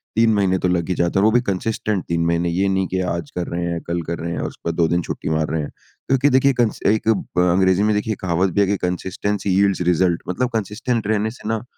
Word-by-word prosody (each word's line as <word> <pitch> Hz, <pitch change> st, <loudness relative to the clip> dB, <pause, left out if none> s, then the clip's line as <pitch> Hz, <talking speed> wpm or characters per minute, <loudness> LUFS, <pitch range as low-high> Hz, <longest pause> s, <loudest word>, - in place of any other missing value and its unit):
3 115 Hz, 0 st, +4 dB
महीने 95 Hz, -3 st, +2 dB
तो 90 Hz, -, 0 dB
लग 90 Hz, -1 st, 0 dB
ही 90 Hz, -, 0 dB
जाते 85 Hz, +3 st, +1 dB
हैं -, -, +3 dB
और -, -, +5 dB
वो 110 Hz, -, +5 dB
भी 120 Hz, +2 st, +3 dB
कंसिस्टेंट 105 Hz, 0 st, -2 dB
3 85 Hz, 0 st, 0 dB
महीने। 85 Hz, +1 st, +1 dB
ये 95 Hz, +3 st, +1 dB
नहीं 95 Hz, -1 st, 0 dB
कि 95 Hz, -, -2 dB
आज 85 Hz, -3 st, -5 dB
कर 90 Hz, -1 st, -2 dB
रहे 85 Hz, +1 st, -3 dB
हैं, 85 Hz, -, -2 dB
कल 85 Hz, 0 st, -1 dB
कर 85 Hz, 0 st, -2 dB
रहे 85 Hz, +1 st, -4 dB
हैं, 85 Hz, -, -3 dB
और -, -, -2 dB
उसके -, -, -6 dB
बाद 85 Hz, -, -3 dB
2 85 Hz, -2 st, +3 dB
दिन 85 Hz, +2 st, +1 dB
छुट्टी -, -, -5 dB
मार 80 Hz, -1 st, 0 dB
रहे 80 Hz, -, -1 dB
हैं, 75 Hz, -, -5 dB, 0.4 s
क्योंकि 135 Hz, +1 st, +3 dB
देखिए 135 Hz, +1 st, +4 dB
कंस 120 Hz, -3 st, 0 dB
एक 110 Hz, +2 st, +1 dB, 0.3 s
ब 90 Hz, 0 st, +4 dB
अंग्रेज़ी 95 Hz, +2 st, +3 dB
में 105 Hz, 0 st, +2 dB
देखिए 105 Hz, +1 st, -1 dB
कहावत 90 Hz, +1 st, +1 dB
भी 100 Hz, -, +3 dB
है 100 Hz, -, +3 dB
कि 100 Hz, +1 st, +1 dB
कंसिस्टेंसी 95 Hz, +3 st, -2 dB
यील्ड्स 100 Hz, -1 st, +2 dB
रिजल्ट। 85 Hz, 0 st, +1 dB
मतलब 125 Hz, +8 st, 0 dB
कंसिस्टेंट 110 Hz, +2 st, -2 dB
रहने 110 Hz, 0 st, +1 dB
से 115 Hz, -, -10 dB
ना 110 Hz, 0 st, -1 dB
95 Hz, 270 wpm, -21 LUFS, 85-105 Hz, 0.4 s, और